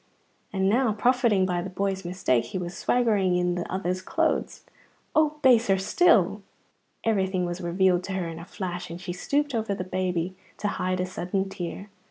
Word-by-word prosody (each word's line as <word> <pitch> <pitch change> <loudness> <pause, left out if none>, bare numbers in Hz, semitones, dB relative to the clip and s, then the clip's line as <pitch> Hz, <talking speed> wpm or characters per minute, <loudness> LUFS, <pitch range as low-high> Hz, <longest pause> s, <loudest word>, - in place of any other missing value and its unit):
and 190 -1 +1
now, 235 +3 +3
profiting 235 -3 +3
by 180 -1 0
the 185 - -5
boy's 195 0 -2
mistake, 175 -10 0
he 120 - -5
was 175 -1 -5
swaggering 210 -7 +2
in 180 0 +1
that 175 -1 -4
other's 185 0 -2
clothes - - -1 0.5
(oh, 310 -1 +3
baser 230 -6 +5
still!). 345 - +3 0.6
Everything 190 -4 +1
was 175 +1 -4
revealed 180 +1 +2
to 195 - -4
her 185 -2 -2
in 165 0 -6
a 165 - -9
flash, 180 -2 -5
and 170 +1 -7
she 180 -1 -5
stooped 285 +10 -1
over 220 -3 -1
the 185 - -4
baby 185 -1 -2 0.2
to 210 - -1
hide 185 -1 -1
a 180 - +1
sudden 185 +1 -2
tear. 195 +2 -6
190 Hz, 180 wpm, -26 LUFS, 180-205 Hz, 0.6 s, baser